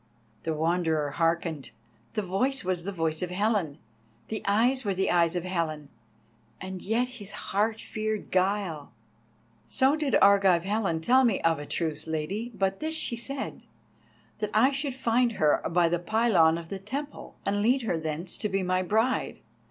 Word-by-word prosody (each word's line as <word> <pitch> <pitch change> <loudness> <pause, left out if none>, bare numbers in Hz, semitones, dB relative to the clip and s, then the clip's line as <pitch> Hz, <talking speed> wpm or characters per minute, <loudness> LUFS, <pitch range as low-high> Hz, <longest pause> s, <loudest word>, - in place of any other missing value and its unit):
The 160 +3 -2
Wanderer 160 -2 0
hearkened. 165 -2 -1 0.5
The 215 - 0
voice 255 +9 0
was 180 -2 -2
the 200 - -2
voice 160 -4 -1
of 180 - -2
Helen, 190 -5 0 0.5
the 220 - -3
eyes 245 +6 +3
were 200 -3 -1
the 190 +1 +1
eyes 170 0 +3
of 175 - -1
Helen, 160 -5 -3 0.7
and 190 -1 -6
yet 230 +5 0
his 225 -6 -9 0.2
heart 215 +3 +1
feared 215 -1 -4
guile. 185 -5 0 0.7
"So 265 +3 +3
did 300 -3 0
Argive 195 -4 +5
Helen 195 -5 -1
tell 255 +9 +4
me 230 -6 +2
of 165 -2 +2
a 145 - -7
truth, 160 -2 -3
Lady, 185 +10 -3
but 195 -1 0
this 315 +1 -2
she 290 -6 0
said, 270 +4 -5 0.7
that 210 -1 -1
I 255 +6 +5
should 275 -1 -2
find 240 -1 +2
her 155 -7 +2
by 170 0 +3
the 175 +1 0
pylon 175 -5 +3
of 165 -1 -8
the 195 - -5
temple, 275 +9 -6
and 205 +1 0
lead 250 +4 +2
her 175 -7 -1
thence 160 +3 -3
to 210 - -1
be 195 -1 0
my 185 0 +1
bride. 220 +7 0
195 Hz, 170 wpm, -27 LUFS, 165-225 Hz, 0.7 s, Argive